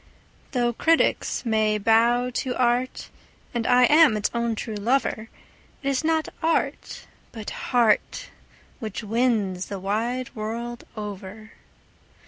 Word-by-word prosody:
Though 240 -2 +1
critics 325 0 +1
may 215 -2 +2
bow 235 +4 +3
to 250 0 -2
art, 245 +1 0 0.4
and 235 -1 -1
I 250 0 +5
am 295 -3 +6
its 205 - -1
own 235 -1 -1
true 220 +1 -5
lover, 225 +1 0 0.5
It 275 - 0
is 275 +2 0
not 320 0 +1
art, 325 0 -1 0.3
but 220 -3 -7
heart, 245 - +1 0.5
which 220 -2 -5
wins 215 -5 0
the 200 - -5
wide 235 +7 -2
world 235 +2 -5
over. 210 +1 -7
235 Hz, 120 wpm, -24 LUFS, 215-250 Hz, 0.5 s, am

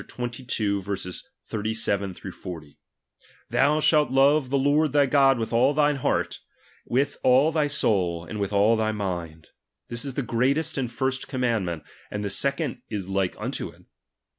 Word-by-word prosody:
37, 120 +1 -6
38, 100 -4 -2 0.2
39, 105 -3 -2 0.2
40): 80 -5 -9 0.7
Thou 150 +3 +3
shalt 150 -3 +4
love 135 +1 +4
the 140 - +2
Lord 145 +3 +2
thy 145 -1 +5
God 135 -1 +4
with 115 0 -3
all 130 +5 +4
thine 145 -1 +3
heart, 130 - -1 0.5
with 135 +4 0
all 130 +5 +5
thy 155 -2 +1
soul, 90 - 0
and 105 +4 -6
with 100 0 -1
all 105 +3 +4
thy 110 -1 0
mind; 85 -6 -5 0.4
this 120 0 -3
is 135 -3 -5
the 140 - -1
greatest 135 +7 +1
and 125 -4 -2
first 130 +2 -2
commandment. 110 - -1 0.3
And 105 0 -4
the 100 - -2
second 140 - -1
is 100 -4 -4
like 95 -1 0
unto - - -4
it. - - -18
120 Hz, 160 wpm, -25 LUFS, 100-140 Hz, 0.7 s, thy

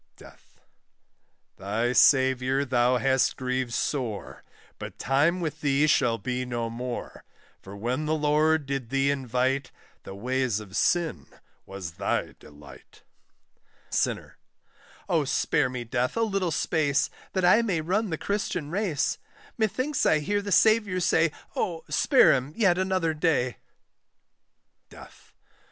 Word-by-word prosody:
DEATH. - - -18 1.0
Thy 115 +5 -1
Saviour 130 +1 +3
thou 125 -1 +2
hast 130 0 +1
grieved 130 -1 -2
sore, 120 -8 -3 0.4
But - - -8
time 150 +7 +1
with 155 -2 -4
thee 145 0 +2
shall 120 -6 +2
be 125 +1 -3
no 120 -2 -3
more; 120 +1 -6 0.4
For 95 +1 -11
when 125 +8 -2
the 155 - +1
Lord 155 0 +2
did 135 -3 -4
thee 135 +1 +1
invite, 130 0 -1 0.3
The 95 - -10
ways 125 +1 -1
of 100 -3 -11
sin 165 - 0 0.4
was 95 -4 -7
thy - - -2
delight. 75 0 -16 0.9
SINNER. - - -2 0.7
Oh - - +1
spare 130 - +1
me, 125 -1 -5
Death, 125 - -2
a 230 - +2
little 195 -5 -1
space, 145 -3 0 0.2
That 185 -2 +1
I 200 +6 +6
may 200 -8 -1
run 190 +7 -1
the 160 - -2
Christian 180 -6 -3
race! 180 -7 -1 0.4
Methinks 255 +6 -1
I 155 - +4
hear 205 +7 -1
the 205 0 -6
Saviour 210 -2 +3
say, 165 -2 +2 0.2
Oh 165 -3 -2
spare 270 - +5
him 135 +2 -2
yet 190 -6 +2
another 185 -4 0
day; 150 - 0 1.3
DEATH. - - -16
140 Hz, 135 wpm, -26 LUFS, 125-175 Hz, 1.3 s, I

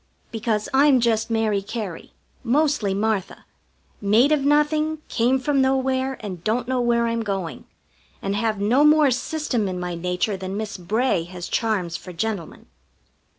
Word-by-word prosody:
Because 220 -2 -1
I'm 275 -1 +5
just 225 -1 +1
Mary 220 -3 +1
Cary, 200 -4 -6 0.3
mostly 275 -4 +1
Martha; 210 -2 -2 0.6
made 220 +8 +4
of 300 -3 +2
nothing, 300 +2 +2
came 245 +3 +2
from 275 +1 +1
nowhere, 265 0 +1
and 185 -5 -7
don't 230 +4 0
know 255 -1 0
where 235 -1 +2
I'm 230 0 -1
going, 195 -6 -4 0.5
and 195 +1 -2
have 215 0 -1
no 235 +8 +3
more 300 -2 +5
system 255 -4 -1
in 185 -1 -3
my 180 0 -3
nature 180 +4 -1
than 190 +1 -5
Miss 215 -1 -4
Bray 195 0 0
has 175 0 -7
charms 190 -7 -1
for 180 - -10
gentlemen. 195 -1 -4
225 Hz, 150 wpm, -23 LUFS, 195-265 Hz, 0.6 s, I'm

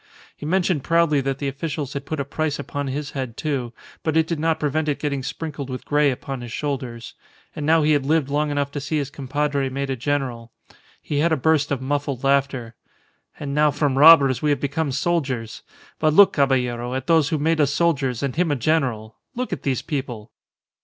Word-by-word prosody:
He 150 - -7
mentioned 180 -4 +1
proudly 165 -4 +3
that 135 0 -2
the 140 - -3
officials 140 0 -4
had 140 -1 -6
put 155 - -3
a 140 - -1
price 150 +1 -2
upon 145 0 -4
his 140 +2 -4
head, 130 -4 -5
too; 135 -6 -2 0.3
but 160 -1 0
it 160 - +4
did 165 -1 -3
not 160 +1 +1
prevent 155 +1 0
it 145 - 0
getting 140 -2 -2
sprinkled 145 0 -5
with 130 0 -6
grey 145 0 +3
upon 135 0 -5
his 120 -1 -8
shoulders. 130 -4 -4 0.4
And 150 -1 -3
now 160 0 +4
he 155 - +3
had 145 -2 +3
lived 150 0 +1
long 150 +2 0
enough 145 -1 -1
to 145 - -4
see 145 +3 -2
his 140 -2 -2
compadre 140 0 -1
made 135 +1 -3
a - - 0
general. 125 -3 -2 0.5
He 145 - -2
had 165 +3 +2
a 160 - +3
burst 150 +1 +2
of 135 -2 -1
muffled 140 -2 -2
laughter. 135 -4 +1 0.7
"And 140 -1 -4
now 150 +1 +4
from 145 -2 0
robbers 140 -3 +7
we 150 - +1
have 145 - +1
become 145 +1 -1
soldiers. 130 -6 -2 0.4
But 155 -1 +2
look, 200 +1 +7
Caballero, 125 -3 0
at 130 0 -3
those 160 -3 +3
who 160 - 0
made 160 +2 +1
us 145 - +2
soldiers 140 -6 0
and 135 -2 -2
him 175 0 +1
a 145 - +1
general! 125 -6 -1 0.2
Look 250 +1 -3
at - - -4
these 130 -3 -1
people!" 125 -7 -5
145 Hz, 210 wpm, -22 LUFS, 130-155 Hz, 0.7 s, robbers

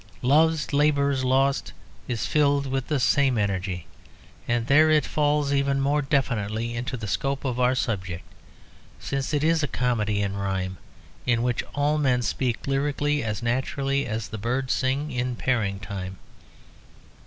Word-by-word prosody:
"Love's 155 +4 +3
Labour's 140 -2 +2
Lost" 135 +2 +1 0.3
is 115 -3 -2
filled 145 -2 +2
with 135 -1 -2
the 150 -3 0
same 135 -1 +3
energy, 95 -4 -2 0.6
and 120 -1 0
there 155 +5 +5
it 155 -1 +4
falls 145 -1 +1
even 140 0 +1
more 145 +2 +2
definitely 115 -5 -1
into 125 +2 -3
the 110 - -6
scope 135 +9 -2
of 125 -2 -1
our 125 +1 +3
subject, 90 -8 -2 0.8
since 135 -1 -3
it 145 -1 0
is 160 0 +3
a 150 - 0
comedy 110 -6 0
in 100 0 -2
rhyme 95 -1 -2 0.5
in 120 -1 +2
which 120 -1 0
all 145 +1 +1
men 125 -4 +2
speak 120 +2 -1
lyrically 145 +1 0
as 105 -1 -3
naturally 135 +3 0
as 110 -1 -3
the 110 - -6
birds 125 +4 -1
sing 140 +3 -1
in 125 -1 -2
pairing 110 -6 0
time. 95 -1 -6
130 Hz, 155 wpm, -25 LUFS, 110-140 Hz, 0.8 s, there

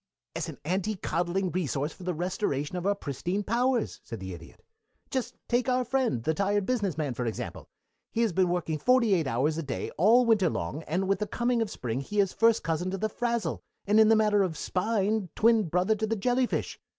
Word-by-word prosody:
"As 165 0 -3
an 155 - -8
anti 190 +5 -1
coddling 180 +1 -1
resource 150 -4 -1
for - - -16
the 180 -1 -2
restoration 175 -3 -2
of 180 +1 -2
our 200 - +2
pristine 175 +5 -3
powers," 240 +2 0
said 115 - -7
the 95 -1 -6
Idiot. 85 -1 -13 0.5
"Just 260 -2 -2
take 245 +1 +1
our 250 - +3
old 250 -2 -2
friend, 250 - +1
the 160 - +1
tired 200 +3 +1
business 205 - -1
man, 145 -5 -1
for 120 0 -3
example. 110 - -5 0.4
He 230 - 0
has 220 -6 +1
been 185 0 +2
working 170 -3 -1
forty 235 - +4
eight 165 -6 +1
hours 140 +6 0
a - - -1
day 140 -5 -4
all 230 +7 +6
winter 210 -6 +4
long, 130 - -3
and 185 +4 0
with 195 - +1
the 210 - -2
coming 240 +2 0
of 225 - -1
spring 125 -3 -3
he 205 +9 -3
is 195 -2 +2
first 230 0 +3
cousin 165 +3 -1
to 195 - -3
the 215 +3 -1
frazzle, 235 0 -2 0.2
and 210 +2 +4
in 220 - +7
the 225 - +6
matter 210 -1 +3
of 175 -5 -1
spine 205 +2 0
twin 225 -1 +4
brother 180 +6 +2
to 220 +1 -2
the 225 - 0
jellyfish. 245 +4 0
195 Hz, 220 wpm, -28 LUFS, 160-220 Hz, 0.5 s, in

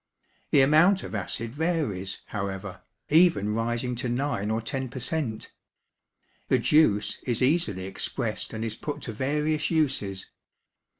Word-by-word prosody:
The 140 - +5
amount 160 +8 +5
of - - -7
acid 110 +3 -3
varies, 145 - -2
however, 100 -1 -5 0.3
even 155 - +4
rising 120 +2 -1
to 125 0 -2
9 120 -5 -1
or 110 +1 +1
10 130 +3 -3
per 125 - -9
cent. 125 -3 -3 0.9
The - - +4
juice 125 -10 +3
is 120 0 +1
easily 125 - +1
expressed 110 +3 -3
and 110 0 -4
is 110 -1 -2
put 145 +3 -5
to 115 - -4
various 150 +5 0
uses. 130 - -1
120 Hz, 135 wpm, -27 LUFS, 105-150 Hz, 0.9 s, The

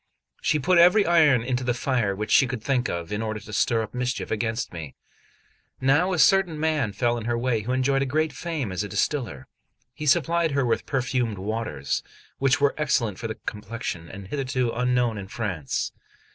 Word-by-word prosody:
She 155 - +2
put 175 +4 +3
every 180 +5 +6
iron 155 -8 +5
into 125 +1 -1
the 120 -1 0
fire 120 -6 0
which 105 +2 -4
she 135 - +6
could 120 -3 -5
think 125 -2 0
of, 85 +1 -4
in 105 +1 -2
order 110 -1 -3
to 105 - -11
stir 115 +2 +2
up 110 - -8
mischief 125 0 -2
against 115 +1 -2
me. 80 -5 -7 0.8
Now 145 +8 +3
a 180 - 0
certain 185 -2 +4
man 155 -8 +1
fell 120 +3 0
in 110 - -7
her 120 0 0
way, 120 -2 0
who 115 +4 -4
enjoyed 135 +1 +1
great 155 +3 0
fame 155 - -3
as 95 +2 -2
a 105 - -6
distiller; 100 - -2 0.5
he 150 +3 -5
supplied 165 +3 +2
her 140 -2 +1
with 115 - 0
perfumed 125 -5 -1
waters, 105 -7 -2 0.4
which 135 -1 +3
were 140 0 +3
excellent 120 -9 0
for 115 - -3
the 110 - -4
complexion, 105 -5 -5
and 100 -1 -9
hitherto 130 -3 -1
unknown 125 -2 +1
in 95 - -7
France. 95 - -3
125 Hz, 190 wpm, -25 LUFS, 110-140 Hz, 0.8 s, every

